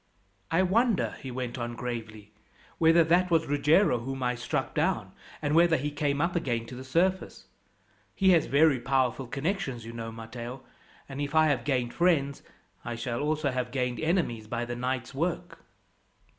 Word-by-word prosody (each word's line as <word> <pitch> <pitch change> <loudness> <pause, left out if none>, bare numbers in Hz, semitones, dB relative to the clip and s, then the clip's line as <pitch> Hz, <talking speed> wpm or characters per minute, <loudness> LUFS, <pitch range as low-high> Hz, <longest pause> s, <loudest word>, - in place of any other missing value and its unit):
"I 165 +3 +3
wonder," 220 +3 +2
he 135 - -6
went 125 0 -4
on 120 0 -4
gravely, 110 -3 -6 0.5
"whether 165 +1 +6
that 175 +3 +3
was 165 -2 +3
Ruggiero 145 +1 +3
whom 135 +2 -5
I 125 0 +1
struck 125 0 -3
down, - - 0 0.3
and 145 0 0
whether 165 0 +5
he 145 +2 -3
came 145 -1 -1
up 170 +3 0
again 120 -8 -1
to 125 - -9
the 130 - -8
surface. 180 +8 0 0.7
He 190 -1 +4
has 165 -4 +4
very 145 -1 +4
powerful 130 0 0
connections, 140 - -3
you 115 - -8
know, 115 -1 -5
Matteo; 120 +3 -8 0.4
and 135 +1 -6
if 145 +2 -3
I 155 0 +5
have 130 -5 0
gained 125 -4 0
friends, 150 -6 +1 0.4
I 120 - -4
shall 120 0 -3
also 150 -1 0
have 125 -1 -2
gained 125 -1 -2
enemies 155 - 0
by 120 +1 -2
the 120 0 -5
night's 125 +1 -3
work." 165 +5 -3
135 Hz, 170 wpm, -28 LUFS, 120-160 Hz, 0.7 s, whether